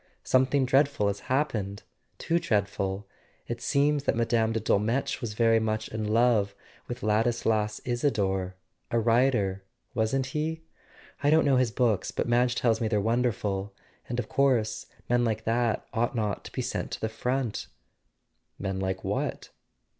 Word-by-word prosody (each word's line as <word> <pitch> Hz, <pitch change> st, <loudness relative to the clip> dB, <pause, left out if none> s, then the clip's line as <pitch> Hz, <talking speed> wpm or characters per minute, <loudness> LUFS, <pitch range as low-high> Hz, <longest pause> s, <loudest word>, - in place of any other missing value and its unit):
Something 130 Hz, +1 st, +3 dB
dreadful 135 Hz, -5 st, +3 dB
has 100 Hz, 0 st, -3 dB
happened... 110 Hz, -8 st, -1 dB, 0.3 s
too 170 Hz, +1 st, +1 dB
dreadful. 100 Hz, -, -1 dB, 0.4 s
It 120 Hz, 0 st, -4 dB
seems 145 Hz, +1 st, +2 dB
that -, -, +2 dB
Mme. 115 Hz, -1 st, +2 dB
de 115 Hz, -, 0 dB
Dolmetsch 110 Hz, +4 st, 0 dB
was 110 Hz, -4 st, -4 dB
very 115 Hz, 0 st, +4 dB
much 110 Hz, 0 st, -2 dB
in 110 Hz, -1 st, -3 dB
love 110 Hz, -3 st, +3 dB, 0.3 s
with 120 Hz, -, -6 dB
Ladis 110 Hz, +3 st, +1 dB
las 105 Hz, -1 st, +1 dB
Isador; 100 Hz, -7 st, 0 dB, 0.4 s
a 115 Hz, -, +1 dB
writer, 115 Hz, -4 st, +2 dB, 0.3 s
wasn't 125 Hz, +3 st, +1 dB
he 155 Hz, +4 st, -2 dB
P 160 Hz, -, -24 dB, 0.6 s
I 145 Hz, -, +3 dB
don't 160 Hz, +1 st, +5 dB
know 135 Hz, -2 st, +4 dB
his 125 Hz, -2 st, +3 dB
books, 110 Hz, -3 st, +1 dB
but -, -, -2 dB
Madge 120 Hz, +1 st, +2 dB
tells 115 Hz, -2 st, +1 dB
me 115 Hz, -, +1 dB
they're 105 Hz, -1 st, +1 dB
wonderful... 105 Hz, -3 st, -1 dB, 0.3 s
and 120 Hz, -, -2 dB
of 120 Hz, -3 st, -2 dB
course 130 Hz, -6 st, +1 dB, 0.2 s
men 120 Hz, 0 st, +2 dB
like 110 Hz, -2 st, -1 dB
that 115 Hz, 0 st, 0 dB
ought 120 Hz, +3 st, 0 dB
not 105 Hz, -3 st, -2 dB
to -, -, -8 dB
be -, -, -3 dB
sent -, -, -3 dB
to -, -, -4 dB
the 110 Hz, -, -1 dB
front.. 125 Hz, +1 st, -2 dB, 0.3 s
." -, -, -49 dB
" -, -, -48 dB
Men 95 Hz, -1 st, -3 dB
like 95 Hz, 0 st, -2 dB
what -, -, -2 dB
115 Hz, 170 wpm, -28 LUFS, 105-125 Hz, 0.6 s, don't